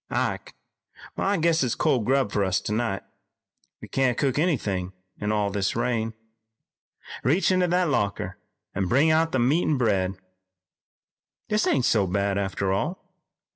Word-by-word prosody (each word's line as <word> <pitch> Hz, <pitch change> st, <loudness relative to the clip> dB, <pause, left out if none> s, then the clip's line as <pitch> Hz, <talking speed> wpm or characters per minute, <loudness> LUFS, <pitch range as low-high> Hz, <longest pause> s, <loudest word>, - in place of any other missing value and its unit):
Ike, -, -, -2 dB, 0.6 s
I 200 Hz, +1 st, 0 dB
guess 165 Hz, 0 st, +2 dB
it's 125 Hz, -, 0 dB
cold 120 Hz, -5 st, +1 dB
grub 130 Hz, -4 st, +2 dB
for 100 Hz, -, +1 dB
us 95 Hz, +1 st, +1 dB
tonight. 105 Hz, -2 st, -2 dB, 0.8 s
We -, -, -7 dB
can't 130 Hz, -3 st, +1 dB
cook 140 Hz, 0 st, 0 dB
anythin' 100 Hz, -, -1 dB, 0.3 s
in 105 Hz, 0 st, -1 dB
all 105 Hz, -1 st, 0 dB
this 100 Hz, 0 st, -1 dB
rain. 115 Hz, -2 st, -1 dB, 1.1 s
Reach 160 Hz, +9 st, +2 dB
into 185 Hz, -1 st, +2 dB
that 180 Hz, +1 st, +2 dB
locker 100 Hz, -7 st, -1 dB, 0.3 s
an' 95 Hz, -1 st, -1 dB
bring 140 Hz, -, +4 dB
out 160 Hz, +1 st, +2 dB
the -, -, +1 dB
meat 135 Hz, +8 st, +3 dB
an' 150 Hz, -, +2 dB
bread. 95 Hz, -6 st, +1 dB, 1.3 s
This 210 Hz, 0 st, +1 dB
ain't 130 Hz, -3 st, +2 dB
so 100 Hz, -4 st, +2 dB
bad, 100 Hz, +1 st, 0 dB
after 95 Hz, -1 st, -1 dB
all. 155 Hz, -, -4 dB
120 Hz, 150 wpm, -25 LUFS, 100-155 Hz, 1.3 s, bring